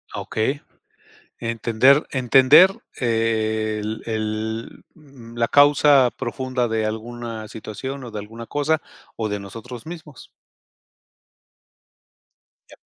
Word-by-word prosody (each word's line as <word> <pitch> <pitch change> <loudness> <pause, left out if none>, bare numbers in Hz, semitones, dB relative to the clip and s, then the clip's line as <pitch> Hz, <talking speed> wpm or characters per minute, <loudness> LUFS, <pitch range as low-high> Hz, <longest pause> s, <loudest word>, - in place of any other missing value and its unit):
Okey. 135 +7 -2 0.8
Entender 115 +4 +3
entender 135 +7 +6 0.3
el 110 -2 -1
el, 110 0 -4
mm, 135 -7 -15
la 115 0 +1
causa 145 -3 +5
profunda 130 0 -3
de 110 -1 -1
alguna 115 0 -6
situación, 130 +5 -7
o 120 - -8
de 110 - -6
alguna 115 +3 -9
cosa 150 +2 0 0.4
o 110 -1 -2
de 105 -1 -3
nosotros 115 +6 -10
mismos. 160 -5 -10 2.4
Ya. - - -14
115 Hz, 100 wpm, -22 LUFS, 110-135 Hz, 2.4 s, entender